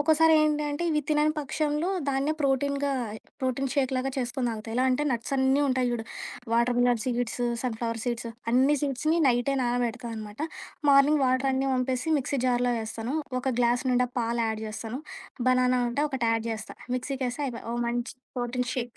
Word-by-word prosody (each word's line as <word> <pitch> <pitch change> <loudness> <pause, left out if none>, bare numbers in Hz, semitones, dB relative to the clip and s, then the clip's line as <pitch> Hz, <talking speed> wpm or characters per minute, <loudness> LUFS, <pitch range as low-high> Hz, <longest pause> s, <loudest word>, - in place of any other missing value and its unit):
ఒ‌కొసారి 320 +2 +5
ఏంటి 300 0 +2
అంటే, 290 +4 -2
ఇవి 300 -1 +2
తినని 305 0 +3
పక్షంలో, 300 +3 -1 0.2
దాన్నే 275 +2 +1
ప్రోటీన్‌గా 280 0 +1 0.5
ప్రోటీన్ 260 +1 -1
షేక్‌లా 260 -2 +1 0.2
చేసుకొని 250 0 -1
తాగుతా. 220 0 -6
ఎలా 255 - +2
అంటే 255 +3 +1
నట్సన్నీ 265 +3 +1
ఉంటాయి 255 -1 +1
జూ‌డు 235 -2 -2 0.5
water 235 +1 +3
melon 245 -1 +3
seeds, 245 -1 -1 0.2
sun 245 -3 -2
flower 230 -1 -2
seeds 235 -1 -2 0.2
అన్ని 265 +4 +4
సీడ్స్‌ని 300 +4 +1
నైటే 245 +3 +2
నానబెడతానమాట. 230 -3 -2 0.5
మార్నింగ్ 280 +1 +5
వాటరన్నీ 265 +1 +1
వంపేసి 255 +4 -1
మిక్సీ 275 +1 -2
జార్‌లో 245 0 +2
వేస్తాను. 225 +4 -4 0.3
ఒక 265 +1 0
గ్లాస్ 240 +2 +2
నిండా 250 0 +2
పాలు 235 0 0
యాడ్ 220 0 -3
జేస్తాను. 225 +4 -5 0.5
బనానా 255 0 +3
ఉంటే 280 +5 0
ఒకటి 255 -3 -1
యాడ్ 225 0 -1
జేస్తా. 220 -2 -5 0.2
మిక్సీ 270 +2 -3
కేస్తే 250 +4 -2
అయిపాయే, 235 -2 -7
ఒక 240 - -2
మంచి 240 +2 -2 0.2
ప్రోటీన్ 245 +1 -1
షేక్ 240 -2 -4
255 Hz, 160 wpm, -27 LUFS, 240-275 Hz, 0.5 s, ఒ‌కొసారి